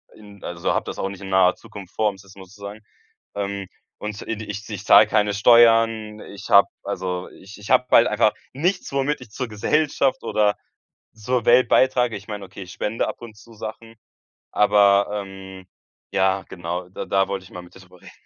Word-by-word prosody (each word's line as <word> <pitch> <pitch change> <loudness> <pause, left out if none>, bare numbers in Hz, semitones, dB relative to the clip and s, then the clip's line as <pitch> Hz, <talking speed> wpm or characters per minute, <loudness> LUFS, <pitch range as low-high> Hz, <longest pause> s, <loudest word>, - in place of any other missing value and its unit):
in 105 -2 -16
also, 85 -1 -2
habe - - -1
das - - -6
auch 95 - -2
nicht 100 0 -10
in 95 - -8
naher 95 -1 +4
Zukunft 95 -3 -12
vor, 110 - +1
ums 100 -2 -4
jetzt 100 0 -18
mal 95 - -11
zu 100 +3 -19
sagen. 100 +2 -8 0.5
Ähm, 100 -1 -4 0.3
und, 105 -1 -6
i 115 - -2
di 110 - -7
ich 105 0 -7
z 110 - -7
ich 95 - -11
zahle 110 - +7
keine 105 -1 +1
Steuern, 115 -1 +4
ich 100 - -11
habe 100 - +7
also, 90 -1 -4
ich 100 +3 -14
ich 105 - -10
habe 125 -1 +4
halt 115 - +6
einfach 105 0 +2 0.2
nichts, 180 +7 -2
womit 140 +2 -1
ich 115 - -13
zur 125 +3 -5
Gesellschaft 135 +5 0
oder 105 -1 +1 0.6
zur 120 +2 -2
Welt 125 +2 +5
beitrage. 125 -4 +2
Ich 100 - -14
meine, 105 -2 -6
okay, 95 +1 -10
ich 90 - -12
spende 110 +2 -2
ab - - -7
und 115 -3 -11
zu 115 +2 -16
Sachen. 115 +1 -9 0.6
Aber, 100 -1 +4
ähm, 95 -2 -8 0.5
ja, 95 0 +1
genau, 90 0 -5
da - - -6
da 95 0 +2
wollte 100 -1 -4
ich - - -16
mal 90 - -9
mit 90 - -17
drüber 90 -1 -17
reden. - - -14
105 Hz, 205 wpm, -22 LUFS, 95-115 Hz, 0.6 s, zahle